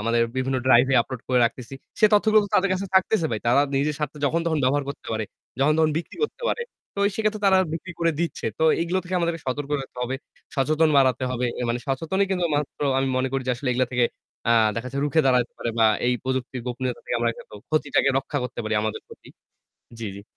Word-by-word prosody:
আমাদের 115 +2 +1 0.2
বিভিন্ন 130 0 0
drive 125 0 +6
এ - - +4
upload 130 0 -7
করে 125 - +3
রাখতেছি। 125 +2 -3 0.3
সে 215 - +8
তথ্যগুলো 215 +1 +5
তো 205 - -7
তাদের 195 +1 +4
কাছে 190 +1 -2
থাকতেছে 190 -2 +3
ভাই। 110 - -2
তারা 120 +4 +5 0.2
নিজের 145 +2 +1
স্বার্থে 150 0 -3
যখন 165 +4 +1
তখন 160 -2 +1
ব্যবহার 140 +2 +2
করতে 140 - -7
পারে, 110 0 -1 0.3
যখন 140 +3 +4
তখন 160 -1 +4
বিক্রি 170 - -8
করতে 455 - -8
পারে। 470 - -2 0.3
তো 200 - -3
সেইক্ষেত্রে 215 0 -1
তারা 190 -1 +5
বিক্রি 170 +2 -5
করে 170 0 +2
দিচ্ছে। 170 - -2
তো - - -1 0.2
এইগুলো 170 +2 0
থেকে 180 +1 -4
আমাদেরকে 170 -1 -1
সতর্ক 140 +3 -3
থাকতে 135 -2 -10
হবে, 125 +2 -2 0.4
সচেতন 155 +4 +3
বাড়াতে 130 -2 +3
হবে। 125 0 -1
এ - - -1
মানে 120 +1 -1
সচেতনই 165 +9 0
কিন্তু 185 -2 0
একমাত্র 145 -2 -2 0.2
আমি 135 0 +1
মনে 130 +1 +1
করি 135 -1 -1
যে 125 - +2
আসলে 130 +2 -4
এগুলা 130 +1 +1
থেকে 125 -1 +3 0.5
আ - - +6 0.2
দেখা 115 +3 -4
যাচ্ছে 135 - -5
রুখে 155 +2 +3
দাঁড়াতে 125 -2 +2
পারে 115 - -2
বা 115 - +6 0.2
এই 125 - +3
প্রযুক্তির 130 -1 -2
গোপনীয়তা 125 0 -3
থেকে - - -1
আমরা 120 0 +1
কিন্তু - - -13
ক্ষতিটাকে 150 -3 +2
রক্ষা 145 +2 -3
করতে 125 -1 -6
পারি 110 0 -1
আমাদের 110 0 -3
ক্ষতি। - - -15 0.7
জি, 115 - -5
জি। 100 - -9
135 Hz, 225 wpm, -24 LUFS, 125-165 Hz, 0.7 s, সে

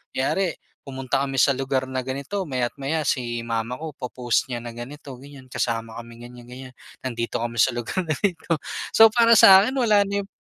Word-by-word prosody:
kunwari 175 +6 0 0.3
pumunta 135 0 -2
kami 135 -1 -2
sa 140 - +4
lugar 135 0 -2
na 130 -1 -3
ganito 140 +10 -4
maya't 125 -6 -3
maya 150 +2 -2
si 120 -2 -1
mama 115 +2 -3
ko 155 -3 -7
po-post 125 0 -2
niya 120 - -3
na 120 0 -9
ganito 135 +3 -9
ganyan, 135 0 -14
kasama 115 -2 -3
kami 115 0 -10
ganyan-ganyan 125 +1 -11 0.2
nandito 120 -3 -3
kami 120 0 -4
sa 115 +3 +3
lugar 120 +10 -3
na 160 - -4
ito, 165 -5 -1 0.3
so 225 0 +8
para 230 +1 +3
sa 190 0 +9
akin 255 - -1
wala 210 -4 +4
na 200 0 -2
yung - - -15
130 Hz, 190 wpm, -23 LUFS, 120-155 Hz, 0.3 s, sa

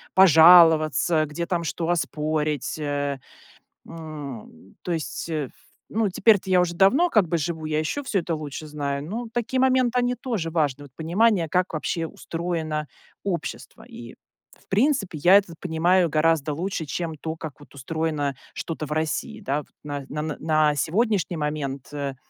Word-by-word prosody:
пожаловаться, 165 -2 +6
где 150 +4 -4
там 170 -1 -1
что 165 +2 -3
оспорить. 155 -3 -1
Э, 145 -2 -2 0.7
м, 145 - -9
то 180 - -3
есть, 165 +1 -4
э, 150 -5 -2 0.4
ну, 220 -1 0
теперь-то 200 0 +3
я 180 -1 +5
уже 170 -1 -1
давно 255 - +4
как 215 - +3
бы 170 +1 0
живу, 160 0 -3
я 155 0 0
еще 155 - -2
всё 215 -7 0
это 170 -1 -3
лучше 150 0 -6
знаю, 140 -2 -3
но 230 +8 -5
такие 245 +2 -1
моменты, 255 -1 +3
они 245 0 0
тоже 225 - -3
важны- 145 -4 0
вот 140 - -16
понимание, 175 +1 +2
как 180 0 0
вообще 165 +2 -2
устроено 160 -3 -4 0.4
общество. 170 -8 -5
И, 120 0 -11 0.4
в - - -27
принципе, 215 - +1
я 175 +6 +6
это 195 -4 -1
понимаю 175 +1 +2
гораздо 155 -1 +2
лучше, 170 +1 -3
чем 160 +2 -4
то, 160 +2 -5
как 160 -3 -8
вот 145 - -17
устроено 145 -1 -2 0.2
что-то 160 -2 -5
в - - -11
России, 160 +8 -2
да 145 -8 -1
вот. 150 - -10 0.2
На 145 -2 -5
на 150 0 -4
на 155 -1 +2
сегодняшний 185 - 0
момент, 145 -3 -4
э, 140 -2 -3
160 Hz, 160 wpm, -24 LUFS, 150-185 Hz, 0.7 s, пожаловаться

